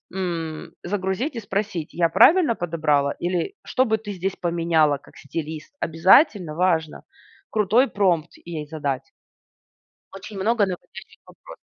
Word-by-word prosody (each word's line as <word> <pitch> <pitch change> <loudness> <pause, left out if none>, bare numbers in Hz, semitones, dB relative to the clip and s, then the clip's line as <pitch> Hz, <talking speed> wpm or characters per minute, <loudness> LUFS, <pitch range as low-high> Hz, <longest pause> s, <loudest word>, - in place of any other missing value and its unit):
м, 165 -4 -4
загрузить 195 - -2
и 230 - -4
спросить: 200 -5 -3
"Я 170 -1 +2
правильно 235 - +5
подобрала?"- 150 -5 0
или- 175 - -1
"Что 260 0 +1
бы 220 -1 +1
ты - - -3
здесь 190 +1 -3
поменяла 165 -4 +2
как 140 - -19
стилист?" 155 - -6
Обязательно, 175 - +4
важно, 165 -3 0 0.5
крутой 220 +5 +3
промпт 175 -5 +1 0.2
ей 155 -3 -5
задать. 145 -4 -4 1.0
Очень 200 +1 -9
много 215 +2 +2
наводящих 185 -2 -9
вопросов. - - -14
175 Hz, 130 wpm, -23 LUFS, 160-205 Hz, 1.0 s, правильно